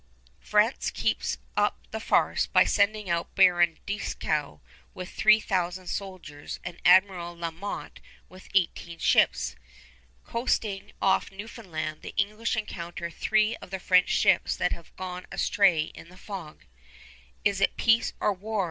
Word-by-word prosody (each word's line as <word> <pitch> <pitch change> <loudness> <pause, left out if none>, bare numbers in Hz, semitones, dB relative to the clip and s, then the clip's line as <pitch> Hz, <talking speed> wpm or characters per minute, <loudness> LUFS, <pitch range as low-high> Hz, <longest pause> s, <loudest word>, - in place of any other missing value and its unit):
France - - +2
keeps - - -1 0.2
up - - +2
the - - -4
farce - - +2
by - - +5
sending 210 0 +1
out 170 -1 -2
Baron 175 -3 +5
Dieskau 155 - -2 0.4
with 185 0 -7
three 215 0 +5
thousand 185 -2 -2
soldiers 180 -7 -6
and 175 -1 -8
Admiral 180 -1 +4
La 170 -1 -3
Motte 195 +5 -7 0.3
with 185 0 -15
eighteen 170 -2 0
ships. - - +2 0.7
Coasting 215 -4 -2
off 190 - +2
Newfoundland, 185 -7 -6
the - - -9
English 215 +4 0
encounter 170 -4 -5
three 215 +4 +1
of - - -12
the 190 - -3
French 180 0 +3
ships - - +3
that - - 0
have 170 - -8
gone 180 -1 -6
astray 185 -6 +3
in 165 - -12
the 185 - -16
fog. 185 -6 -9 0.8
"Is 200 -1 +2
it 195 - +2
peace 230 0 +3
or 210 - +2
war?" 210 +3 -4
185 Hz, 140 wpm, -27 LUFS, 170-205 Hz, 0.8 s, by